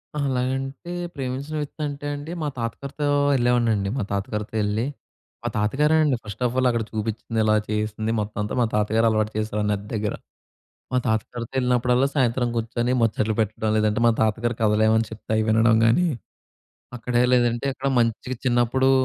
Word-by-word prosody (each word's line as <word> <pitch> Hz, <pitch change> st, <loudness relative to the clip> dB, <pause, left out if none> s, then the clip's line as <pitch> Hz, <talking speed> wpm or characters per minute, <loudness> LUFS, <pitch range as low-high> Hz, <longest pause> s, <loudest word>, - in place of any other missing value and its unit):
అహా! 145 Hz, -1 st, 0 dB
అలాగంటే 135 Hz, +6 st, -2 dB, 0.2 s
ప్రేమించిన 135 Hz, +3 st, -4 dB
వ్యక్తంటే 145 Hz, -1 st, -5 dB
అండి, 145 Hz, +3 st, -7 dB
మా -, -, 0 dB
తాతగారితో 140 Hz, +5 st, -3 dB, 0.3 s
యెళ్ళేవాడినండి 120 Hz, -5 st, +2 dB
మా 125 Hz, -, 0 dB
తాతగారితో 105 Hz, +2 st, -3 dB
యెళ్లి, 105 Hz, +3 st, 0 dB, 0.6 s
మా -, -, -2 dB
తాతగారేనండి 150 Hz, +7 st, +3 dB
ఫస్ట్ 105 Hz, +3 st, -6 dB
ఆఫ్ 120 Hz, -, 0 dB
ఆల్ 130 Hz, -, +3 dB
అక్కడ 115 Hz, -2 st, 0 dB
చూపిచ్చింది 110 Hz, +1 st, -3 dB
ఇలా 110 Hz, 0 st, +3 dB
చేయిస్తంది 110 Hz, +1 st, -1 dB
మొత్తమంతా 105 Hz, 0 st, -3 dB
మా -, -, +4 dB
తాతగారలవాటు 110 Hz, 0 st, +2 dB
చేసారు, 110 Hz, -1 st, -1 dB
నది 100 Hz, 0 st, -3 dB
దగ్గర. 105 Hz, -1 st, -1 dB, 0.8 s
మా -, -, +3 dB
తాత 110 Hz, -1 st, +2 dB
గారితో 120 Hz, 0 st, -6 dB
యెళ్ళినప్పుడల్లా 125 Hz, +1 st, +2 dB
సాయంత్రం 125 Hz, -2 st, +2 dB
గూర్చొని 120 Hz, +1 st, -1 dB
ముచ్చట్లు 110 Hz, -1 st, +1 dB
బెట్టడం. 110 Hz, 0 st, 0 dB
లేదంటే 110 Hz, +1 st, +1 dB
మా 115 Hz, -, +6 dB
తాతగారి 115 Hz, +2 st, +1 dB
కథలేమైనా 110 Hz, +1 st, +3 dB
చెప్తే 110 Hz, -, -11 dB
అయి 110 Hz, -, +2 dB
వినడం 115 Hz, +1 st, +4 dB
గానీ, 175 Hz, +11 st, +4 dB, 0.9 s
అక్కడే 120 Hz, +1 st, 0 dB
లేదంటే 120 Hz, 0 st, +2 dB
అక్కడ 135 Hz, +1 st, -3 dB
మంచిగా 115 Hz, +2 st, 0 dB
చిన్నప్పుడు, 120 Hz, +2 st, +3 dB
115 Hz, 150 wpm, -24 LUFS, 110-130 Hz, 0.9 s, మా